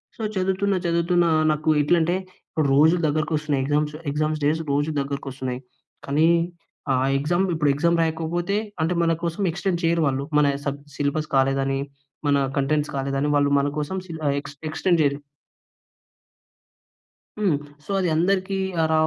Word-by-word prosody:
So 225 - -9
చదువుతున్న 190 +1 +1
చదువుతున్న 170 +1 +2 0.3
నాకు 155 +1 -1
ఎట్లా 160 +4 +3
అంటే 175 +3 +1 0.6
రోజులు 160 +5 +5
దగ్గరకి 155 +2 -1
వస్తున్నాయి. 150 -3 0
ఎగ్జామ్స్ 150 +1 0 0.2
ఎగ్జామ్స్ 155 +1 -1
డేస్ 155 +2 +2
రోజు 145 +2 +1
దగ్గరికి 140 0 -4
వస్తున్నాయి. 130 -1 -4 0.5
కానీ 150 +4 +3 0.7
ఆ - - +3 0.2
ఎగ్జామ్‌లు 175 +6 +1
ఇప్పుడు 150 -2 +2
ఎగ్జామ్ 170 +4 +2
రాయకపోతే 165 +4 -1 0.3
అంటే 165 +3 +1
మన 165 - +2
కోసం 170 +3 -2
ఎక్స్‌టెండ్ 175 0 -2
చేయరు 165 0 +2
వాళ్ళు. 135 0 -1
మన 150 - +5 0.2
సబ్ 140 0 -2 0.2
సిలబస్ 145 +2 -1
కాలేదని, 135 0 +2 0.5
మన 145 - +4 0.2
కంటెంట్స్ 150 +2 +1
కాలేదని 135 +1 -1
వాళ్ళు 145 0 +3
మన 140 - +1
కోసం 150 +6 -3
సి 165 - -7 0.3
ఎక్స్ 145 -1 -11
ఎక్స్‌టెండ్ 170 +1 +1
జేయరు. 140 0 +1 2.2
హ్మ్. 190 -9 +2 0.3
సో, - - -22
అది 180 -3 +1
అందరికీ 190 +3 +1 0.3
ఆర 160 0 +1
155 Hz, 145 wpm, -23 LUFS, 145-170 Hz, 2.2 s, రోజులు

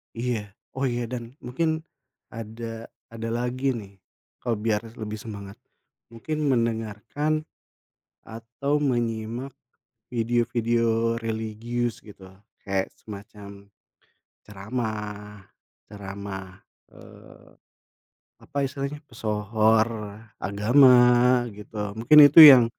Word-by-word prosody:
Iya. 115 -4 -3 0.2
Oh 135 - 0
iya, 120 -1 -1
dan 120 -1 -6
mungkin 160 +6 -1 0.5
ada 115 0 -7 0.2
ada 115 0 -5
lagi 125 +3 -1
nih, 100 -4 -9 0.4
kalo 120 -2 -1
biar 105 -1 0 0.2
lebih 110 -1 -5
semangat. 100 -3 -9 0.6
Mungkin 155 +7 -4
mendengarkan 115 +5 -1 0.8
atau 120 +6 -3
menyimak 120 -1 -2 0.6
video-video 115 -1 +1
religius 115 +1 -3
gitu, 100 -3 -14 0.4
kayak 95 -1 -1
semacam 100 -1 -11 0.7
ceramah, 105 -1 -6 0.4
ceramah, 95 -1 -8 0.3
eee, - - -16 0.9
apa 145 - -7
istilahnya, 140 +2 -5
pesohor 110 -2 +1 0.5
agama 125 +6 +5 0.5
gitu, 105 0 -6
mungkin 120 +7 +6
itu 145 +3 +8
yang 130 -5 +10
115 Hz, 85 wpm, -25 LUFS, 105-125 Hz, 0.9 s, yang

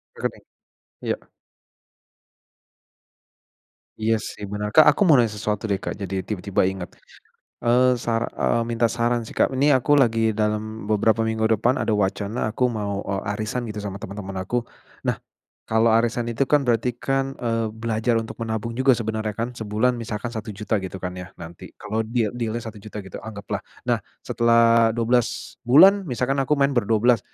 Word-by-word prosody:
Rekening? - - -4 0.6
Iya. - - -1 2.9
Iya 110 +1 +3
sih, 105 - -7
benar 105 0 -2
Kak. 155 +7 +7
Aku - - -8
mau 145 - +7
nanya 115 -3 +2
sesuatu 105 -1 -2
deh 100 -3 0
Kak, - - -4
Jadi 95 -1 -2
tiba-tiba 100 -1 -2
ingat. 95 -2 -6 0.7
Eee, 125 +2 +4
sar 115 0 0
eee, 115 - +1
minta 115 0 +1
saran 120 +1 0
sih - - -11
Kak, - - +3
ini 135 +3 +2
aku 130 +3 +1
lagi 115 -3 +2
dalam 105 0 -2
beberapa 110 +1 +2
minggu 110 0 -1
depan 120 +5 +2
ada 110 - 0
wacana 105 +3 -1
aku 115 +4 -1
mau, 100 -1 -3
e 100 - -2 0.2
arisan 115 +2 -3
gitu 105 -1 -5
sama 100 -1 -4
teman-teman 100 -1 -7
aku. 120 +6 -2 0.4
Nah, - - +1 0.5
kalau 110 +1 +3
arisan 115 +1 +2
itu 125 +4 0
kan 150 -1 +4
berarti 120 0 +2
kan, 135 +1 -1
eee, 115 -1 -1 0.2
belajar 115 +1 0
untuk 110 - -8
menabung 110 0 -3
juga 130 0 +5
sebenarnya 110 -1 -3
kan. 115 +2 -2
Sebulan 110 +3 +1
misalkan 115 0 -4
Rp1.000.000 105 0 -3
gitu 95 0 -6
kan 90 -1 -3
ya, 90 0 -7
nanti 85 0 -10
kalau 105 +1 -2
deal 115 -1 0
deal-nya 115 0 -2
Rp1.000.000 105 -1 -9
gitu 95 - -8
anggaplah. 100 -2 -5 0.3
Nah, - - +2 0.3
setelah 115 -1 +4
12 120 0 +2 0.4
bulan 190 +11 +7
misalkan 125 +3 0
aku 135 +2 +1
main 140 0 +3
ber-12 115 +1 +3
115 Hz, 160 wpm, -23 LUFS, 105-120 Hz, 2.9 s, Kak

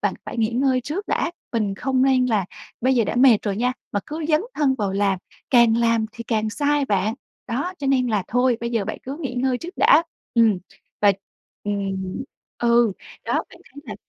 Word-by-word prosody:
bạn - - 0
phải - - -6
nghỉ 220 -1 +2
ngơi 255 +1 +2
trước 310 - -4
đã, - - 0 0.2
mình 215 -4 0
không 260 +5 0
nên 260 -1 +4
là 215 -5 +1 0.4
bây 260 +2 +3
giờ 235 -3 +3
đã 210 - -3
mệt 245 -3 +6
rồi 200 -2 -2
nha 250 +2 +1 0.2
mà 205 - 0
cứ 310 +1 -5
dấn 305 -1 +4
thân 285 -3 +2
vào 205 -6 -2
làm, 195 -1 +1 0.3
càng 235 -3 +5
làm 230 -1 +2
thì 235 -1 -8
càng 220 -2 0
sai 290 +3 +1
bạn. 205 -2 0 0.3
Đó, 285 +11 -2
cho 280 - -3
nên 260 -2 +3
là 215 -4 0
thôi 245 0 +2
bây 235 0 -3
giờ 225 -4 0
bạn 215 - -4
cứ 270 +2 -6
nghỉ 265 -6 -4
ngơi 255 0 0
trước 350 +6 -9
đã. - - +6 0.3
Ừm. 225 -5 +4 0.4
Và 205 -1 +6 0.5
ừm. 195 -2 -3 0.4
Ừ. 235 -2 +3 0.3
Đó, - - -2 0.2
bạn - - -15
thấy 285 - -14
là 215 -6 -6
235 Hz, 210 wpm, -22 LUFS, 215-265 Hz, 0.5 s, mệt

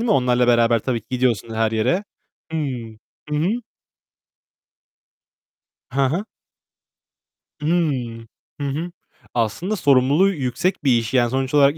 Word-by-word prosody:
değil 235 - -1
mi? 235 - 0
Onlarla 125 -2 +3
beraber 115 -1 +4
tabii 120 +1 -2
ki 110 - -32
gidiyorsun 120 -3 0
her 110 0 +1
yere. 125 - +1 0.5
Hıı. 160 -2 -1 0.6
Hı 150 - 0
hı. 160 +5 +1 2.4
Ha 135 +2 +1
ha. 180 +8 -2 1.3
Hıı. 140 -8 -1 0.4
Hı 140 - -1
hı. 160 +6 -3 0.4
Aslında, 140 - -1
sorumluluğu 145 +3 +4
yüksek 145 +2 -1
bir 130 -4 +4
iş. 115 0 -3
Yani, 120 -2 +3
sonuç 130 +2 -1
olarak 145 +1 +5
130 Hz, 125 wpm, -21 LUFS, 120-155 Hz, 2.4 s, olarak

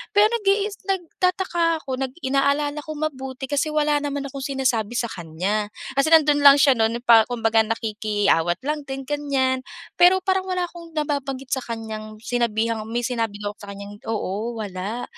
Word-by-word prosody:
Pero 415 - +7
nag 470 - 0
iis 410 +1 +1
nagtataka 350 -3 0
ako, 260 0 -3
nag 260 -1 -2
inaalala 280 +2 +1
ko 310 0 -7
mabuti 265 -3 -4
kasi 285 +3 0
wala 300 -1 +1
naman 285 -1 -3
akong 275 0 -7
sinasabi 255 -6 0
sa 235 -1 -1
kanya, 185 +6 -2 0.3
kasi 275 - +3
nandun 300 -2 +6
lang 280 -1 +9
siya 280 -1 +5
nun 225 +1 +1
pa 230 -2 +6
kumbaga, 225 -2 +1
nakikiawat 210 -6 0
lang 295 0 -3
din, 270 0 -5
ganyan. 270 -2 0 0.4
Pero 365 +1 +6
parang 380 0 0
wala 365 -1 -1
akong 340 -2 -9
nababanggit 275 -3 -3
sa 265 - +1
kanyang 220 -2 -6
sinabihang 230 -2 -1
may 240 +2 -2
sinabi 230 -4 -1
daw 205 0 -2
ako 210 - -22
sa - - -8
kanyang 200 +1 -9
oo, 220 +1 -3
wala 205 +2 -4
265 Hz, 170 wpm, -23 LUFS, 225-300 Hz, 0.4 s, lang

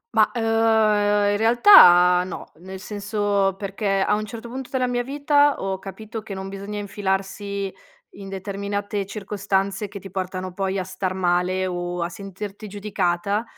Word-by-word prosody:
Ma, - - +5
uhm, 235 - -3 0.9
in 205 - +1
realtà 180 - +7
no, 185 - -8
nel 190 +3 -9
senso, 205 -1 -1
perché 195 0 -1
a 200 - +2
un 215 0 -1
certo 230 +2 -8
punto 255 +1 -7
della 255 -1 0
mia 245 0 -1
vita 285 +2 +2
ho 190 -1 -3
capito 215 +3 -8
che 200 -2 -8
non 190 0 -6
bisogna 200 +1 -6
infilarsi 200 0 -3 0.4
in 195 -1 -10
determinate 200 +1 -4
circostanze 200 -1 -2
che 200 0 -9
ti 195 -1 -11
portano 185 -1 -4
poi 195 +1 -2
a 190 - -1
star 185 0 -4
male 180 +1 +1
o 175 -1 -3
a 170 - -3
sentirti 200 +3 -8
giudicata. 200 0 -1
195 Hz, 155 wpm, -23 LUFS, 190-210 Hz, 0.9 s, realtà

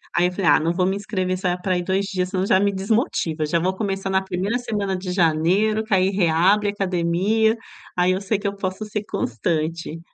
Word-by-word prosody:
Aí 175 +1 +4
eu 180 - -3
falei: 185 0 -3
"Ah, 145 - +6
não 165 +2 0
vou 180 +1 +1
me 190 +1 +1
inscrever 185 -3 -2
só 185 -1 -1
vai 175 - -1
pra 185 -1 0
ir 175 - -2
2 190 +2 0
dias, 185 -2 -2
senão 185 0 -1
já 190 - +4
me 200 +1 +2
desmotiva, 195 - 0
já 170 +3 +1
vou 185 +3 0
começar 195 -1 -2
na 190 0 +2
primeira 190 +4 -1
semana 205 -5 -2
de 185 0 -4
janeiro, 180 +6 +2
que 220 -2 -3
aí 185 0 +4
reabre 190 +3 +3
academia, 195 +3 +1 0.4
aí 180 +1 +3
eu 185 - -1
sei 200 +1 0
que 205 - -3
eu 200 - -3
posso 190 +2 -4
ser 210 0 -4
constante. 165 - -2
190 Hz, 225 wpm, -22 LUFS, 180-200 Hz, 0.4 s, Ah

